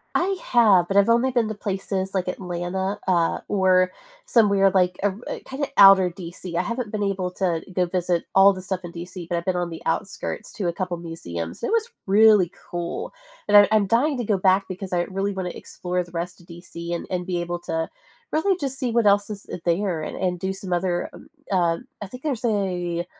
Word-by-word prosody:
I 385 +2 +2
have, 205 -8 +4
but 195 - +1
I've 200 - +5
only 235 +3 +3
been 240 -3 +1
to 215 - -3
places 195 -1 -3
like 185 -2 -1
Atlanta, 180 +2 -3
uh, 170 -3 +2
or 185 -2 +3 0.3
somewhere 200 -4 +4
like, 180 -1 +2
er 200 0 0 0.3
kinda 275 +2 -3
outer 195 -2 +8
DC. 175 -1 -7
I - - +3
haven't 235 -1 -4
been 215 - -3
able 190 -2 -1
to 175 -3 -1
go 180 0 +2
visit 175 -1 -1
all 195 +1 +8
the 185 -1 -6
stuff 190 -1 -3
in 175 - -7
DC, 175 +1 -8
but 170 - 0
I've 170 - -4
been 185 -1 0
on 175 -1 -1
the 165 - -8
outskirts - - -3
to 195 -6 -3
a 170 - 0
couple 180 0 -3
museums. 85 - -6
It - - -1
was 460 +1 +1 0.2
really 205 -3 +5 0.2
cool, 175 0 -4 0.3
and 205 - +3
I 205 0 +9
I'm 215 -2 +3
dying 260 +6 +2
to 240 - -2
go 205 -2 +1
back 190 +1 +3
because 185 0 -6
I 175 -1 +1
really 195 +2 -2
wanna 185 -2 -3
explore 180 +1 -4
the 175 - -16
rest 175 +1 -5
of 175 - -20
DC 170 0 -8
and 170 - -4
and 180 -1 -2
be 180 -1 -2
able 175 0 -3
to 165 -1 -2 0.5
really 365 +4 +2
just 270 -2 -3
see 250 -4 -1
what 230 -1 +2
else 205 0 +4
is, 205 -1 -7
eh - - -5
there 175 -1 0
and 155 - -5
and 180 -1 -1
do 190 - -1
some 190 -1 -5
other, 175 0 -1
um - - -13 0.3
uh, 170 -3 +2 0.2
I 205 - -5
think 250 +6 -11
there's 265 -6 -2
a 180 -5 -1
190 Hz, 215 wpm, -23 LUFS, 175-205 Hz, 0.5 s, I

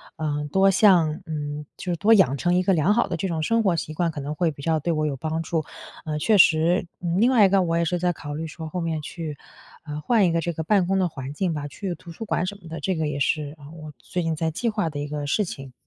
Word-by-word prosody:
呃， 150 -1 -2
多 195 +2 +4
向 175 -6 +4
嗯， 150 -1 -4
就 180 - -4
是 - - 0
多 210 +7 +5
养 190 - +5
成 175 +6 +1
一 180 - +2
个 195 - +3
良 170 +4 +3
好 235 - +2
的 170 - -2
这 190 - -2
种 165 -3 -2
生 230 +6 +2
活 190 -4 +2
习 155 -1 -4
惯， 170 +2 0
可 150 - -6
能 145 +2 -4
会 165 +2 +1
比 145 - -11
较 160 0 +1
对 170 +3 -1
我 155 -1 0
有 145 -2 -1
帮 160 +3 -2
助。 165 -1 -1 0.4
嗯， 155 -1 -2
确 210 +8 +3
实， 170 +3 +4
呃， 175 - -2
另 235 +4 +5
外 225 -6 +6
一 - - +4
个 195 0 +4
我 165 -2 0
也 170 - +1
是 180 +1 -1
在 180 0 +1
考 145 -3 -7
虑 160 +2 -4
说 160 +1 -8
后 180 +3 -3
面 165 -2 -2
去， 155 -1 -6 0.5
呃， 150 -1 -5
换 220 +4 +3
一 175 - +2
个 165 0 +1
这 170 +1 -2
个 160 - -4
办 190 +1 +2
公 195 +1 +1
的 185 - +2
环 135 -2 -7
境 175 +2 -1
吧， 145 -1 -4
去 185 +5 -5
图 170 - -12
书 195 +7 -7
馆 185 - 0
什 200 +1 -5
么 170 - -13
的， 165 0 -6
这 185 +6 -1
个 160 -1 -1
也 145 -1 -3
是， 145 +1 -1
呃， 145 - -14
我 155 -2 -9
最 175 +8 -4
近 165 -1 -1
在 160 +1 -1
计 230 +9 -1
划 205 -6 -1
的 145 -2 -6
一 145 - -3
个 145 0 -4
事 210 +9 +1
情。 135 -6 -8
165 Hz, 315 characters per minute, -24 LUFS, 150-180 Hz, 0.5 s, 外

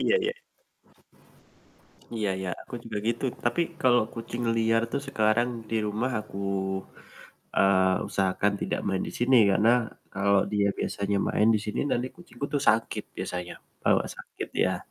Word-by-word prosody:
iya - - +3
iya. 455 - +1 1.9
Iya 105 -2 0
iya, 95 -1 -3
aku - - -9
juga 110 -2 -5
gitu 120 +2 -1 0.2
tapi 120 +8 +2 0.2
kalau 125 -2 +5
kucing 120 +1 -5
liar 115 0 +3
tuh - - -1
sekarang 115 -2 +2 0.2
di 115 - -1
rumah 110 +5 -1
aku, 105 -2 -9 1.2
eee, 95 -1 +4
usahakan 95 +1 +1
tidak - - -1
main 95 -1 0
di - - -5
sini, 125 +2 +4 0.2
karena 105 +4 +4 0.4
kalau 100 +1 +3 0.2
dia 100 -1 +3
biasanya 100 0 -1
main 105 - +3
di - - +1
sini 105 - -2
nanti 125 +1 +1
kucingku 140 -6 -6
tuh 145 - +1
sakit 110 +1 +1
biasanya, 90 -1 -4 0.3
bawa - - +4
sakit, - - -7
iya. - - +3
110 Hz, 150 wpm, -27 LUFS, 100-120 Hz, 1.9 s, kalau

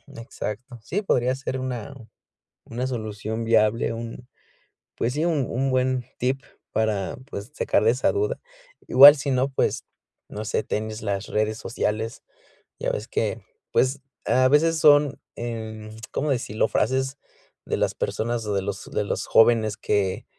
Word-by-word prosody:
Exacto. 120 0 -6
Sí, 195 - -2
podría 125 - +1
ser 130 -1 -4
una 125 -1 -4 0.7
una 120 +2 -3
solución 110 -2 -4
viable, 115 0 +3
un 115 +2 -7 0.7
pues 120 +2 0
sí, 155 +3 0
un 155 -7 +1
un 135 +3 0
buen 130 -1 +1
tip 130 +2 0 0.3
para, 110 -3 0
pues, 100 0 -6
sacar - - +1
de 115 - +6
esa 125 - +1
duda. 425 +4 -1 0.5
Igual, 140 +3 +10
sino, 135 -1 0
pues, 135 - -1 0.4
no 105 +1 -6
sé, 105 - -1
tienes 110 +1 -4
las 100 -1 -2
redes 110 +1 -1
sociales. 110 0 -3 0.6
Ya - - 0
ves - - -4
que, - - -1 0.3
pues, 130 +2 +2 0.2
a 130 0 +4
veces 165 +3 +4
son, 145 -2 +5 0.2
em, 110 -2 -6 0.2
¿cómo 150 - -1
decirlo?, 110 -4 0
frases 130 +5 0 0.5
de - - -1
las - - +1
personas 115 0 -2
o 105 - -2
de 100 - +1
los 100 0 -5
de - - 0
los 100 - -3
jóvenes 110 -3 +4
que 95 -3 0
120 Hz, 150 wpm, -24 LUFS, 110-135 Hz, 0.7 s, Igual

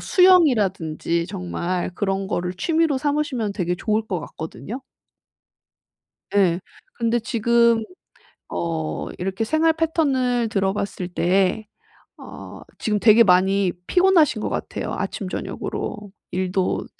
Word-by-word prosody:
수영이라든지 200 - +3
정말 180 -1 -3
그런 195 0 -1
거를 180 -1 -2
취미로 315 - +1
삼으시면 285 -7 -1
되게 180 -3 -1
좋을 215 +3 -1
것 180 -6 -2
같거든요. 160 - -7 1.5
예. 185 -3 +3 0.3
근데 235 0 0
지금 230 +1 +2 0.7
어 160 -2 -3
이렇게 195 +4 -2
생활 315 +6 +2
패턴을 270 -8 +1
들어 195 -2 0
봤을 200 -3 -4
때 190 +4 +1 0.5
어 - - -10 0.2
지금 210 -1 0
되게 225 +2 +6
많이 190 0 +3
피곤하신 360 - +4
것 - - -2
같아요 - - -4
아침저녁으로. 205 -2 -5 0.2
일도 185 0 -1
210 Hz, 245 characters per minute, -22 LUFS, 185-245 Hz, 1.5 s, 되게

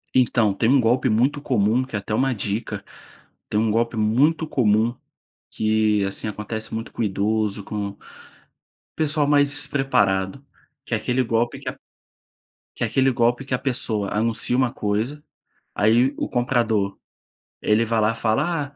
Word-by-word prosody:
Então, 115 -5 +3
tem 115 +4 +1
um 135 0 +5
golpe 120 +2 +2
muito 130 +7 +1
comum, 120 -1 +1
que 130 -4 -7
é - - 0
até 100 - -5
uma 130 +2 +1
dica, 105 +2 -4 0.6
tem 105 - +1
um 110 -1 +1
golpe 115 +1 0
muito 140 +10 +2
comum, 115 -2 +2 0.6
que 110 -1 +1
assim, 100 - -4
acontece 110 +1 -5
muito 115 0 -5
com - - -3
idoso, 105 0 0
com 100 -1 -4 1.0
pessoal 150 -2 +1
mais 145 -1 +4
despreparado, 135 -6 +1 0.4
que - - -5
é - - +3
aquele 125 +4 0
golpe 120 +3 -1
que 130 -2 -5
a 135 - -8 1.0
que - - -7
é - - +3
aquele 135 0 +2
golpe 120 +2 +1
que 135 - -9
a 125 - +2
pessoa 110 -6 -1
anuncia 115 +3 0
uma 130 -2 +1
coisa, 110 +9 -2 0.5
aí 120 +6 +3
o - - -2
comprador, 115 -5 0 0.6
ele 110 +2 +2
vai 115 0 0
lá 110 +1 +2
fala: 140 +7 -1
115 Hz, 155 wpm, -23 LUFS, 105-130 Hz, 1.0 s, um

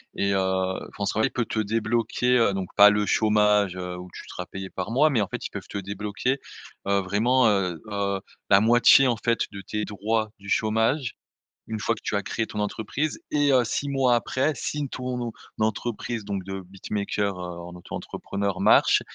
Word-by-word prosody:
et 100 0 +1
heu, 95 0 -1
France 100 -1 -2
Travail 110 +5 +1
peut 120 -3 -1
te 110 - -3
débloquer, 115 +3 +1
heu, 115 -4 +3
donc 95 -2 -3
pas 105 0 +9
le 105 0 +1
chômage, 105 -3 +3
heu, 90 0 -5
où 90 0 -9
tu - - -9
seras 90 - -6
payé 95 +1 -7
par 95 - -4
mois, 150 +6 +4
mais 115 -5 +2
en 100 - 0
fait, - - -6
ils - - -5
peuvent - - -7
te - - -5
débloquer, 100 +6 -2 0.5
heu, 100 0 +3
vraiment, 115 +6 +3
heu 90 -5 0
heu, 100 -1 -1 0.3
la 100 -1 +7
moitié, 120 +3 +6
en 120 - +1
fait, 115 +1 0
de 100 -2 -7
tes 105 +3 -3
droits, 105 +2 -1
du 100 0 -10
chômage. 115 +5 +1 0.5
Une 110 -1 -4
fois 115 +2 0
que - - -13
tu - - -2
as 100 - +1
créé 115 - -2
ton 105 - -6
entreprise 110 +8 -2
et 145 -1 +3
heu, 125 -1 +5
6 140 +5 -2
mois 135 -3 +3
après 130 +6 0
si 145 +1 -3
ton 125 -2 -4 0.3
entreprise 110 +1 -2
donc 100 -2 -3
de 95 0 -5
beatmaker, 100 +1 -3
heu, - - -5
en 90 0 -7
auto-entrepreneur 100 +2 -4
marche - - +5
105 Hz, 195 wpm, -25 LUFS, 100-120 Hz, 0.5 s, pas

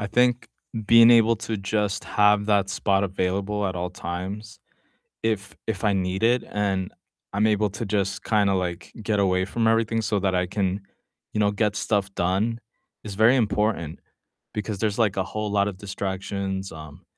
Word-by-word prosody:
I 105 - -2
think 125 +2 +2 0.4
being 115 +2 +7
able 115 -1 +5
to 110 0 -4
just 100 +1 -1
have 105 0 +3
that 100 -2 +2
spot 100 +1 +1
available 100 +2 -1
at 95 - -3
all 90 0 -3
times 95 +4 -6 0.7
if 105 -3 -2
if 110 -2 -3
I 105 -2 +3
need 95 +1 -1
it, 120 +1 +3
and 95 -2 -1 0.4
I'm 105 +2 +2
able 105 -1 +2
to 115 +4 -5
just 100 -1 -1
kinda 100 -3 +2
like 90 -1 -3
get 105 -1 0
away 95 -1 +2
from 115 +2 0
everything 115 0 +2
so 105 -1 0
that 95 -1 0
I 90 0 +1
can, 95 0 -1 0.5
you - - -1
know, 100 -1 +3
get 105 0 0
stuff 100 -1 -1
done 100 +6 0 0.4
is 105 -2 -7
very 110 +5 +5
important, 105 - 0 0.5
because 105 -1 -3
there's, 105 +1 -1
like, 105 -4 +2
a 95 - +2
whole 105 +2 -4
lot 100 0 +2
of 100 - -4
distractions, 95 0 -4
um, 80 +1 -11
100 Hz, 175 wpm, -24 LUFS, 95-110 Hz, 0.7 s, being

